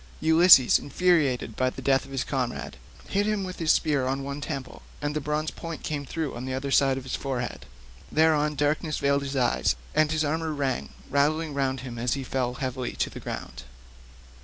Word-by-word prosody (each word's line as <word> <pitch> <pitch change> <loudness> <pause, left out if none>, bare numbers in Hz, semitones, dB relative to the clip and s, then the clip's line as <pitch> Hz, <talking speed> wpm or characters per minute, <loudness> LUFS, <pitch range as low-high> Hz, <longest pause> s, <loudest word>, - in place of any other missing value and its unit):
Ulysses, 160 -5 +7
infuriated 145 -9 +1
by 130 0 +1
the 130 - -10
death 135 0 +2
of 135 - -14
his 135 -1 -1
comrade, 125 -3 -3 0.3
hit 205 +1 0
him 210 -2 0
with 185 -1 -6
his 160 -2 +3
spear 140 -4 +2
on 135 +1 -1
one 140 +1 -5
temple, 140 -3 -6 0.2
and 145 0 -3
the 150 - -1
bronze 150 +2 -1
point 165 -1 -7
came 145 -3 -3
through 160 -1 -3
on 120 +2 -5
the 130 0 -3
other 135 +1 -3
side 135 -1 +4
of 135 - -5
his 130 - -6
forehead. 125 -4 -4 0.4
Thereon 150 -1 +3
darkness 150 +2 0
veiled 140 0 +2
his 140 0 -4
eyes, 125 -2 +2 0.2
and 155 0 +3
his 155 -1 +1
armour 160 +1 -1
rang 135 -4 -2 0.2
rattling 150 +3 +1
round 135 -2 -1
him 120 -3 -7
as 120 +2 0
he 135 - -4
fell 125 -1 -2
heavily 130 -1 -3
to - - -2
the - - -8
ground. - - -6
140 Hz, 200 wpm, -26 LUFS, 130-155 Hz, 0.4 s, Ulysses